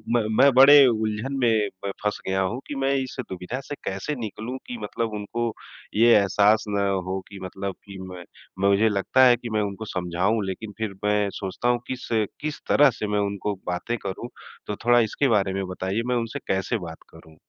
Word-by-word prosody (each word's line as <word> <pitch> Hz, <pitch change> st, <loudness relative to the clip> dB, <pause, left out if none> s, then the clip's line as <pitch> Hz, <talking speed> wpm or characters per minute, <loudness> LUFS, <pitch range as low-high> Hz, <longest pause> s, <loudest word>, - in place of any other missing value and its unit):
मैं 120 Hz, -, +4 dB, 0.2 s
मैं 140 Hz, -, +7 dB
बड़े 140 Hz, +2 st, +9 dB
उलझन 110 Hz, +3 st, -1 dB
में 110 Hz, -3 st, +3 dB, 0.2 s
प 100 Hz, -, -1 dB
फँस 105 Hz, -, -1 dB
गया 95 Hz, 0 st, +1 dB
हूँ 100 Hz, +7 st, -1 dB
कि 145 Hz, -, -5 dB
मैं 135 Hz, 0 st, +1 dB
इस 130 Hz, -, -8 dB
दुविधा 95 Hz, +8 st, -5 dB
से 145 Hz, -, -5 dB
कैसे 100 Hz, +10 st, -3 dB
निकलूँ 115 Hz, +3 st, -5 dB
कि 245 Hz, -1 st, -5 dB
मतलब 115 Hz, -2 st, -3 dB
उनको 115 Hz, +3 st, -3 dB, 0.4 s
ये 115 Hz, +2 st, +6 dB
एहसास 105 Hz, +2 st, +4 dB
ना 100 Hz, -1 st, +1 dB, 0.2 s
हो 95 Hz, +1 st, -2 dB
कि 100 Hz, -1 st, -10 dB
मतलब 95 Hz, +1 st, -5 dB
कि 100 Hz, -1 st, -10 dB
मैं 90 Hz, -1 st, -9 dB, 0.5 s
मुझे 105 Hz, +3 st, +4 dB
लगता 105 Hz, +6 st, +3 dB
है 125 Hz, -1 st, +7 dB
कि 120 Hz, -1 st, -7 dB
मैं 110 Hz, -1 st, 0 dB
उनको 100 Hz, +2 st, -4 dB
समझाऊँ, 95 Hz, +3 st, -1 dB
लेकिन 100 Hz, +2 st, -6 dB
फिर 110 Hz, -3 st, -3 dB
मैं 105 Hz, -1 st, +2 dB
सोचता 100 Hz, +5 st, -2 dB
हूँ 120 Hz, -1 st, +2 dB
किस, 130 Hz, -1 st, -5 dB, 0.3 s
किस 155 Hz, 0 st, -4 dB
तरह 145 Hz, -1 st, +6 dB
से 105 Hz, -, -2 dB
मैं 105 Hz, 0 st, 0 dB
उनको 100 Hz, +1 st, -3 dB
बातें 90 Hz, +7 st, -2 dB
करूँ। 100 Hz, +5 st, -5 dB, 0.4 s
तो 105 Hz, -, -2 dB
थोड़ा 120 Hz, 0 st, +6 dB
इसके 120 Hz, +5 st, +1 dB
बारे 100 Hz, -4 st, +2 dB
में 95 Hz, 0 st, -2 dB
बताइए, 95 Hz, +4 st, -2 dB
मैं 125 Hz, -, +1 dB
उनसे 115 Hz, -1 st, -2 dB
कैसे 95 Hz, +5 st, -1 dB
बात 80 Hz, -, -8 dB
करूँ? 80 Hz, -1 st, -16 dB
105 Hz, 200 wpm, -24 LUFS, 95-120 Hz, 0.5 s, बड़े